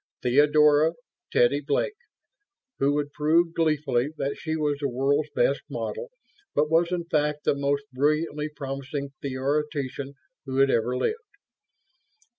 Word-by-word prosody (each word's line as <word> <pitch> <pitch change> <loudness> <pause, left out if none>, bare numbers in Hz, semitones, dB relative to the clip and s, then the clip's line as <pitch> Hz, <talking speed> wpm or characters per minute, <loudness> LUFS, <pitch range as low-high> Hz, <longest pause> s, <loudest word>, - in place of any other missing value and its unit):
Theodora 150 +4 +5 0.4
(Teddy) 130 +4 +3
Blake, 145 - 0 0.9
who 140 +1 +2
would 145 -1 -2
prove 165 +3 +2
gleefully 145 -6 +1
that 140 0 -2
she 160 -1 -3
was 150 -2 0
the 140 -1 -1
world's 140 +4 +1
best - - +2
model 480 +1 -4 0.5
but 150 +1 +2
was 170 +2 +3
in 175 -2 -1
fact 150 -2 0
the - - +3
most 140 0 0
brilliantly 150 +2 0
promising 140 0 -5
theoretician 140 0 -2 0.3
who 130 -1 -4
had 135 0 +5
ever 120 +2 +1
lived. 445 - -1
145 Hz, 130 wpm, -26 LUFS, 140-155 Hz, 0.9 s, Theodora